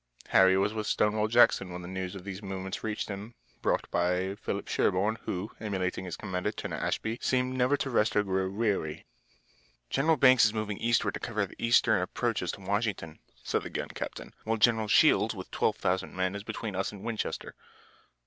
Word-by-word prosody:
Harry 95 0 +6
was 100 +2 +1
with 110 -1 -3
Stonewall 105 0 +2
Jackson 110 -5 +4
when 90 0 -6
the - - -7
news 95 0 -4
of 95 - -8
these 100 0 -6
movements 95 -1 -5
reached 110 -1 -2
them, 105 +3 -7 0.3
brought - - +1
by 90 +2 +1
Philip 100 - -4
Sherburne, 105 +5 +1
who, 95 +4 -3
emulating 95 -3 -2
his 90 - -5
commander, 95 0 -2
Turner - - -5
Ashby, 115 +2 -2
seemed 130 0 +1
never 130 +3 +2
to 135 - -2
rest 110 -2 +2
or 105 - +4
grow 95 -1 0
weary. 100 -7 -1 0.9
"General 155 +4 +3
Banks 130 -2 +6
is 110 0 +3
moving 105 -2 -3
eastward 115 0 +1
to - - -4
cover 105 -3 -1
the - - -14
eastern 115 0 +4
approaches - - -1
to - - -9
Washington," 100 -5 -2 0.2
said - - 0
the - - -8
young - - -3
captain, - - -7
"while 115 +1 0
General 110 -1 +3
Shields - - +4
with - - -8
12,000 95 +1 0
men 95 0 0
is 100 - -5
between 105 -1 -5
us 95 - -1
and 100 -1 -11
Winchester." 115 -2 -3
105 Hz, 185 wpm, -29 LUFS, 95-110 Hz, 0.9 s, Harry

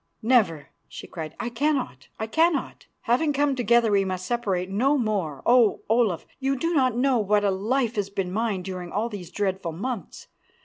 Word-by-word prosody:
"Never," 215 - +2 0.2
she - - -9
cried, 160 -3 -7
"I 240 - -2
cannot, 250 - -1
I 220 - -3
cannot. 320 +6 0
Having 275 +6 +1
come 285 0 +2
together 235 -2 +3
we 200 -1 +3
must 185 -1 -3
separate 195 -7 -1
no 255 +10 +2
more. 195 - -2
Oh! 240 -3 +4
Olaf, 220 -7 +2
you 270 0 0
do 330 +6 -1
not 255 -6 +2
know 255 -1 +2
what 210 0 +2
a 200 - +2
life 230 +4 -1
has 200 -1 -1
been 195 -2 -3
mine 210 -2 -1
during 180 -2 -6
all 220 +4 -1
these 195 -6 -8
dreadful 190 -4 -2
months. 210 +2 -5
220 Hz, 180 wpm, -25 LUFS, 190-250 Hz, 0.2 s, Oh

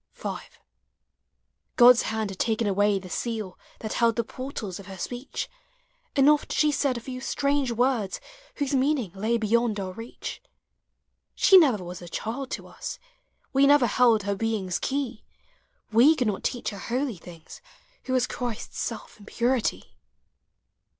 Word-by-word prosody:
v. - - -4 1.5
God's 245 -1 +8
hand 220 -2 -2
had 190 - -10
taken 225 0 +1
away 205 0 +2
the 190 -1 -7
seal 215 -1 -4 0.2
That 220 - -4
held 230 -1 +2
the 235 - 0
portals 230 -6 -6
of 200 - -11
her 190 -1 -8
speech; 245 +8 -5 0.7
And 275 0 +5
oft 300 0 +3
she 300 -1 +3
said 275 -3 0
a - - -6
few 255 +1 -7
strange 280 -1 0
words 235 -4 0 0.4
Whose 285 -1 -2
meaning 265 - +1
lay 220 +4 0
beyond 225 0 +1
our 190 -1 -4
reach. 225 +4 -7 0.9
She 385 - +6
never 265 - +6
was 180 0 -8
a 175 - -9
child 250 +9 -4
to - - -5
us, - - -7 0.6
We 275 +1 +5
never 290 -3 +6
held 230 -2 +4
her 200 0 0
being's 200 -4 -1
key; 265 -5 -3 0.7
He 275 +8 +7
could 250 - 0
not 210 -3 -2
teach 245 -2 -2
her 200 - -8
holy 245 +1 -2
things 165 -1 -12 0.4
Who 260 - -2
was 255 -1 +3
Christ's 240 -3 -5
self 230 -2 -5
in 205 - -15
purity. 245 0 0
235 Hz, 155 wpm, -26 LUFS, 205-260 Hz, 1.5 s, God's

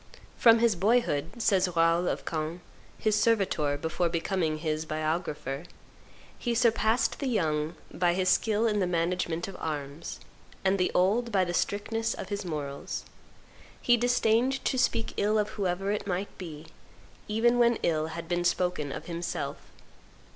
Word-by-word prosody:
"From 230 -1 +6
his 230 -3 +3
boyhood," 195 -3 +1
says 195 -4 +3
Raoul 165 +1 +3
of - - -2
Caen, 160 +2 -3 0.4
his 215 -1 +1
servitor 185 -10 +2
before 160 +3 -1
becoming 165 -1 -1
his 155 0 -2
biographer, 155 -2 -3 0.7
"he 240 -2 -1
surpassed 230 -1 +2
the 275 - -2
young 160 -8 0 0.2
by 175 0 +2
his 185 0 0
skill 215 +4 +2
in 210 -2 +2
the 185 - +1
management 170 0 -1
of 195 - -8
arms, 145 0 -5 0.5
and 190 +1 +3
the 180 - +2
old 220 +6 +2
by 190 -3 +3
the 175 - -3
strictness 225 +5 -1
of - - -7
his 205 -1 -3
morals. 145 -5 -5 0.7
He 240 - +4
disdained 245 +2 +2
to - - +1
speak 230 -2 +1
ill 210 +1 +2
of 210 0 +1
whoever 195 -2 -1
it 210 -1 -2
might 190 +1 -3
be, 160 -4 -8 0.6
even 235 +3 +2
when 235 -1 +4
ill 155 -1 +1
had 165 +1 -6
been 175 +1 0
spoken 175 -5 0
of 150 - -6
himself. 170 0 -4
180 Hz, 155 wpm, -28 LUFS, 160-220 Hz, 0.7 s, From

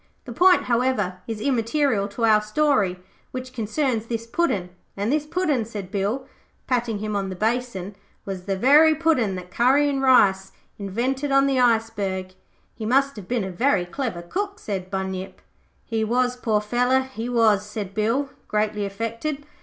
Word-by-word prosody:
The 245 - -7
point, 360 +7 +5
however, 235 -7 0
is 225 -2 -4
immaterial 235 -2 +1
to 220 +3 -1
our 215 -1 +5
story, 215 -5 +1 0.3
which 255 0 -7
concerns 230 0 -1
this 230 -1 -3
Puddin'; 230 - -1 0.3
and 205 +4 -1
this 300 0 0
Puddin',' 310 -7 0
said 205 -4 -7
Bill 210 +7 -1 0.4
patting 240 -4 0
him 215 0 -3
on 195 -1 -1
the 185 - -5
basin, 215 -2 -2 0.3
'was 190 -2 -6
the 195 -1 -1
very 300 +8 +6
Puddin' 280 - +1
that 180 0 -8
Curry 265 +8 +3
and 275 -1 -1
Rice 195 -8 +4 0.3
invented 255 +8 -2
on 275 0 +5
the 270 -2 +1
iceberg.' 215 -6 0 0.4
'He 225 - -8
must 275 +5 +2
have 205 -4 -9
been 240 -3 0
a 190 - -4
very 200 -2 +1
clever 180 -3 -4
cook,' 400 - -3
said 190 - -5
Bunyip. 190 -1 -4 0.5
'He 225 -1 -1
was, 245 +3 +1
poor 220 -4 0
feller, 245 +4 +2
he 255 -3 -6
was,' 220 -4 +3
said 210 -2 -6
Bill, 230 +7 0 0.2
greatly 210 -1 0
affected. 230 +8 -4
230 Hz, 165 wpm, -23 LUFS, 200-260 Hz, 0.5 s, very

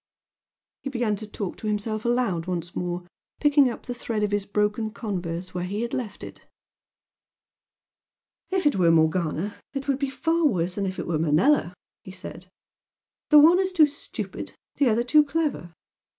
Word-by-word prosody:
He 275 - -4
began 235 -5 0
to 215 - -7
talk 205 -3 -5
to 215 - -6
himself 215 +1 -2
aloud 235 -9 0
once 175 -1 -4
more, 175 0 -3 0.3
picking 290 -3 +5
up 235 - -7
the 245 - -4
thread 230 -3 -3
of 205 - 0
his 205 -1 -1
broken 210 +2 0
converse 185 -5 -5
where 180 0 -3
he 200 +4 -3
had 235 - -4
left 220 -6 -4
it - - -11 2.0
"If 375 -2 0
it 290 -8 +3
were 175 -3 +4
Morgana 165 +3 +1 0.2
it 275 0 -4
would 275 -1 +1
be 275 -1 -1
far 325 +6 0
worse 180 -7 0
than 200 0 -2
if 185 - -5
it - - -4
were 165 -2 -1
Manella!" 170 - +3 0.3
he - - -12
said 185 -1 -9 0.8
"The 300 - +7
one 325 +5 +7
is 380 -1 +1
too 330 -4 +6
stupid 290 0 -7 0.2
the 280 -4 +4
other 230 +2 +2
too 300 +5 +5
clever. 285 - -2
210 Hz, 175 wpm, -25 LUFS, 180-275 Hz, 2.0 s, The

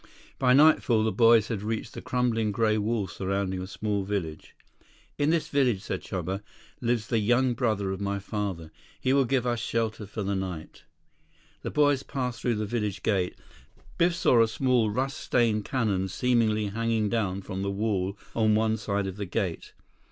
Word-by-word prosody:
By 125 -2 +4
nightfall 135 -6 +5
the 110 - +1
boys 115 -2 +5
had 110 -4 -2
reached 110 +2 -3
the - - -7
crumbling 115 -4 0
gray 110 +1 +2
wall 110 0 0
surrounding 95 0 -2
a 95 - -5
small 105 0 -2
village. 95 -6 -4 0.6
94 - - +2
"In - - +2
this 165 -1 +1
village," 125 -8 +2
said 95 - -3
Chuba, 95 +1 -4 0.4
"lives 120 -2 0
the 115 - 0
young 120 +4 +2
brother 110 -5 0
of 95 +1 -4
my 100 0 -1
father. 100 -5 -4 0.3
He 130 - +1
will 140 -1 +4
give 125 0 0
us 120 -1 0
shelter 110 -2 -2
for 105 +1 -5
the 100 +1 -1
night." 95 -5 -5 0.8
The - - -4
boys 145 -2 +3
passed 125 -3 -4
through 120 -2 +1
the 105 0 -2
village 105 -2 -3
gate. 95 -4 0 0.6
Biff 170 0 +3
saw 125 -8 +4
a 115 - +4
small, 120 -1 +1
rust 130 +6 -2
stained 110 -4 +1
cannon 105 -8 0
seemingly 110 0 +1
hanging 115 0 0
down 100 -4 -1
from 95 0 -5
the 100 - -1
wall 100 -1 -1 0.2
on 110 -2 +3
one 110 0 +2
side 100 -2 -2
of 95 0 -5
the 100 -2 -4
gate. 90 -2 -3
110 Hz, 180 wpm, -27 LUFS, 100-120 Hz, 0.8 s, nightfall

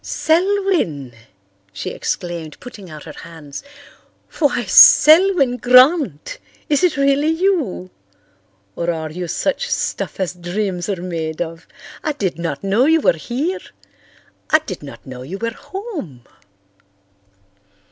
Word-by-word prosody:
"Selwyn!" 335 - 0 0.6
she 95 - -5
exclaimed, 170 -4 -5
putting 210 -7 -11
out 155 -1 -10
her 155 - -10
hands. 160 -4 -10 0.8
"Why, 290 -4 +1
Selwyn 325 - +6
Grant! 255 - +3 0.3
Is 295 +3 +2
it 350 -5 +2
really 280 +1 +2
you? 320 - 0 0.8
Or 170 - -2
are 160 -2 -3
you 175 +2 -5
such 290 - -2
stuff - - -3
as 185 -2 -1
dreams 180 +1 -3
are 185 -3 -3
made 160 -3 -4
of? 165 -1 -5 0.4
I 305 - -1
did 190 - -3
not 165 -3 -4
know 200 +6 +2
you 320 +2 +4
were - - +4
here. 260 - -3 0.9
I 310 - +6
did 185 - -6
not 145 -2 -11
know 130 -2 -9
you 160 +10 -7
were 230 +2 -3
home." 340 - -8
195 Hz, 125 wpm, -19 LUFS, -, 0.9 s, Selwyn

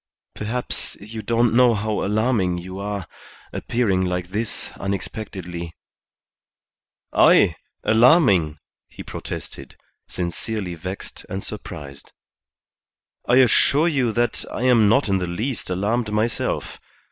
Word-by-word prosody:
"Perhaps 115 +4 -4
you 110 +2 -7
don't 115 0 +2
know 120 -1 +5
how 105 +1 -1
alarming 105 -3 +1
you 95 +2 -7
are, 100 -2 -3 0.5
appearing 100 -6 0
like 90 -1 -2
this 105 +3 -4
unexpectedly 90 -3 -5 0.7
" - - -44 0.2
"I! - - +5 0.3
Alarming!" 110 - +5 0.3
he - - -9
protested, - - -7 0.3
sincerely 90 +2 -3
vexed 90 +4 -7
and 95 +1 -4
surprised. 75 -9 -9 1.1
"I 120 - +4
assure 130 +5 +5
you 135 -8 +1
that 120 +1 0
I 120 - -3
am 120 -5 +5
not 135 +4 +3
in 95 -1 +2
the 90 - -2
least 110 +8 -3
alarmed 105 +5 0
myself. 110 +2 -1
105 Hz, 115 wpm, -22 LUFS, 90-120 Hz, 1.1 s, know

